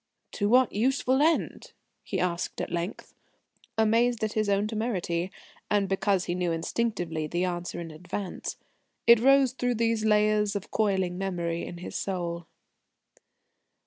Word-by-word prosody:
"To 205 0 -1
what 250 0 +4
useful 260 +4 +2
end?" 320 +2 0 0.3
he - - -3
asked 175 -1 -2
at - - -3
length, 175 +3 -4 0.6
amazed 230 +1 +3
at 215 - -1
his 215 -1 0
own 200 +1 +2
temerity, 195 -6 -2 0.4
and 205 -1 +2
because 195 -1 +1
he 175 - -1
knew 180 -1 0
instinctively 165 -3 -2
the 175 +4 0
answer 175 -1 -3
in 165 -1 -6
advance. 180 +4 -5 0.5
It 235 -1 +8
rose 270 +1 +5
through 245 -1 -1
these 230 -1 +1
layers 210 -1 +3
of 200 - -5
coiling 190 -4 0
memory 170 -3 -2
in 175 - -7
his 175 - -8
soul. 170 -3 -3
200 Hz, 145 wpm, -28 LUFS, 175-225 Hz, 0.6 s, It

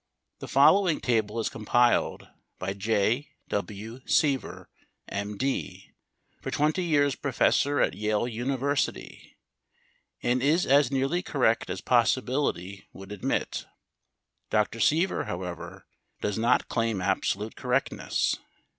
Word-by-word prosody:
The - - -7
following 170 +5 +5
table 110 -2 0
is 110 - 0
compiled 120 +2 +1 0.3
by 95 +1 -3
Jay 110 +6 0 0.2
W. 105 +4 -4
Seaver, 140 -4 +1 0.4
M. 100 +1 -4
D., 95 -8 -3 0.5
for - - -4
20 155 +5 +1
years 145 -4 +2
professor 140 +2 +1
at - - +2
Yale 105 +3 0
University, 135 +4 -2 0.9
and 125 +1 +1
is 155 +6 +3
as 140 -1 +4
nearly 135 +6 0
correct 125 -9 +1
as - - -4
possibility 120 -6 0
would 95 +1 -11
admit. 105 -3 -2 0.8
Dr. 105 +1 0
Seaver, 165 +9 +2
however, 90 -1 -6 0.3
does 105 +1 -2
not 120 +2 +2
claim 115 -4 0
absolute 95 +3 -1
correctness. - - -1
120 Hz, 110 wpm, -27 LUFS, 105-140 Hz, 0.9 s, following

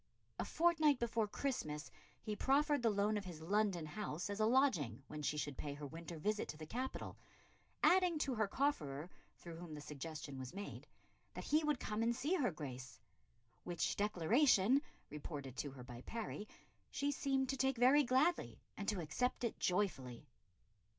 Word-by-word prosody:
A - - 0
fortnight 315 -4 +4
before 230 -2 0
Christmas 155 - -3 0.3
he 215 - -2
proffered 285 +4 +3
the 230 - +4
loan 210 +1 +2
of 200 - -4
his 175 -4 -7
London 190 0 +1
house 180 +1 -4
as 200 - -4
a 215 - +4
lodging 185 - +2
when 150 0 -6
she 150 0 0
should 145 -2 -3
pay 145 -1 -3
her 145 0 -6
winter 165 +3 -7
visit 210 +6 0
to 155 - -6
the 155 - -7
capital, 255 +10 -4 0.6
adding 360 -2 +5
to 280 -3 0
her 215 -3 +1
cofferer, 175 - -1 0.3
through 170 -2 -9
whom 170 -2 -7
the - - -6
suggestion 150 -1 -6
was 130 +5 -7
made, 200 +1 -6 0.5
that - - -5
he 310 +2 +3
would 300 -4 +1
come 215 +1 -2
and 235 +1 +2
see 285 +8 0
her 290 -11 +3
Grace; 130 - -7 0.6
"which 175 -1 -1
declaration," 210 - +4 0.3
reported 145 -3 -6
to 145 - -2
her 130 -2 -10
by 120 -1 -9
Parry, 215 - -5 0.4
"she 285 +1 0
seemed 270 -1 +1
to 270 - +1
take 265 0 +1
very 260 +5 +7
gladly 275 +6 +2 0.2
and 200 - -5
to 205 -5 0
accept 250 +12 -1
it 235 - -1
joyfully." 175 - 0
205 Hz, 175 wpm, -38 LUFS, -, 0.6 s, very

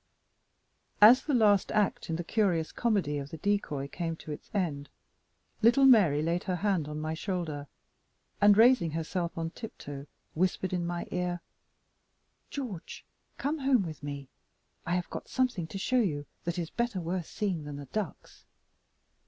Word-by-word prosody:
As 235 +5 +9
the 290 -1 0
last 205 -4 +4
act 210 -4 +1
in 165 - 0
the 175 - -3
curious 175 -4 +1
comedy 195 -11 0
of 140 0 -6
the 160 - -7
decoy 155 -7 -1
came 165 +3 -3
to 155 - -9
its 150 - -8
end, 155 -9 -2 0.7
little 240 +5 +6
Mary 185 - +6
laid 170 +2 -1
her 185 -3 0
hand 185 -4 0
on 150 0 -5
my 155 +1 -2
shoulder, 160 -5 -3 0.7
and, 205 0 +7
raising 230 -6 +6
herself 165 +2 -3
on 165 0 -2
tiptoe, 145 - -8 0.3
whispered 185 +2 0
in 175 -1 -1
my 175 0 -3
ear: 180 -1 -2 1.1
"George, 240 - -6 0.3
come 300 +3 -1
home 265 -5 +3
with 160 -4 -7
me. 140 -1 -6 0.6
I 175 - +1
have 180 -1 -3
got - - -6
something 245 -10 0
to 195 - -6
show 255 +6 +1
you 145 -9 -1 0.2
that 170 +1 -2
is 170 -2 -3
better 235 -5 -1
worth 175 0 -3
seeing 185 -8 -2
than 145 -1 -6
the 140 0 -7
ducks." 200 +5 -6
175 Hz, 160 wpm, -30 LUFS, 155-210 Hz, 1.1 s, As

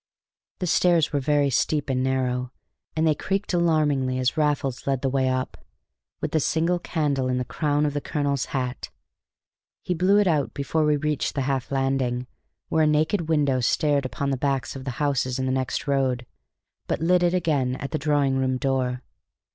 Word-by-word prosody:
The 185 - -3
stairs 170 -2 +3
were 145 - +2
very 145 0 +2
steep 145 +4 +1
and 130 -2 0
narrow, 125 -1 -1 0.4
and 160 0 +1
they 155 - +4
creaked 195 +6 -2
alarmingly 150 -7 +2
as 130 +1 0
Raffles 145 -5 -1
led 135 -1 0
the 135 - +1
way 130 -1 +1
up, 130 0 -3 0.6
with - - -2
the 160 - +2
single 165 +4 +1
candle 145 -6 -1
in 125 0 0
the 125 - -1
crown 145 +4 0
of 145 - -1
the 145 - -2
colonel's 140 -3 -1
hat. 125 -2 -4 0.9
He 180 - -1
blew 185 +4 +3
it 205 - +4
out 155 -6 0
before 155 +2 0
we 150 -1 +3
reached 150 0 -1
the 140 - 0
half 135 -1 -2
landing, 135 -2 0 0.4
where 160 -1 +2
a - - +3
naked 155 +3 +1
window 145 -5 +2
stared 140 +2 +1
upon 140 +2 -3
the 135 - 0
backs 135 -1 -1
of 135 -1 -7
the - - -2
houses 135 -3 0
in 130 - -1
the 130 - 0
next 130 -1 -2
road, 130 -3 0 0.6
but - - -1
lit 175 +3 +3
it 175 0 +2
again 145 -8 +1
at 140 +1 -6
the 155 - -1
drawing 145 -3 +1
room 130 -1 0
door. 130 -2 -1
140 Hz, 190 wpm, -24 LUFS, 130-155 Hz, 0.9 s, they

